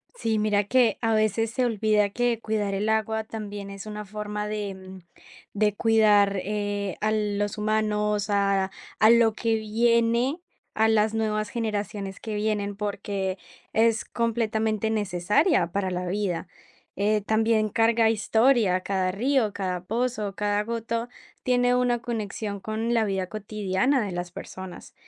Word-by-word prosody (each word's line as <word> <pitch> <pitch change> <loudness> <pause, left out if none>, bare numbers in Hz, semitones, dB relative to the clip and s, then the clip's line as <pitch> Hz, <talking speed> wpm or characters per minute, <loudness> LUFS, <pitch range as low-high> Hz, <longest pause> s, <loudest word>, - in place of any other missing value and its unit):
Sí, 225 - 0
mira 210 -1 +2
que 235 0 +3
a 225 -1 +1
veces 215 +1 +1
se 255 +2 0
olvida 215 -2 +2
que 240 +1 0
cuidar 210 -3 -1
el 205 +2 -1
agua 220 0 0
también 205 -2 -7
es 195 0 -8
una 210 0 -6
forma 210 +1 -4
de, 210 -2 -3
mm, 190 0 -11 0.5
de 210 0 +1
cuidar, 210 -3 +4
eh, 205 -2 -2
a 215 - +1
los 205 -1 -1
humanos 210 -1 0
a 195 -1 +1 0.3
a 220 - +6
lo 230 -1 +5
que 225 0 0
viene 235 +5 +2 0.3
a 220 +1 +3
las 215 0 +3
nuevas 215 -1 -1
generaciones 210 -3 -3
que 220 -2 -5
vienen, 210 -1 -1
porque 200 -2 -3 0.4
es 225 0 +2
completamente 220 -2 0
necesaria 210 - +2
para 195 0 -1
la 180 0 -3
vida, 185 -2 -2 0.5
eh, 210 +2 +1
también 220 +1 +2
carga 225 +1 +3
historia, 220 -3 +3
cada 185 -1 0
río, 235 +1 +1
cada 180 -2 -3
pozo, 225 -2 -2
cada 205 0 0
gota 230 +1 -3 0.3
tiene 245 0 +3
una 245 -1 +2
conexión 215 -3 -4
con 220 +4 -2
la 225 -2 +3
vida 190 -2 -1
cotidiana 215 +5 0
de 200 - -4
las 175 0 -4
personas, 185 +1 -9
215 Hz, 145 wpm, -26 LUFS, 200-225 Hz, 0.5 s, a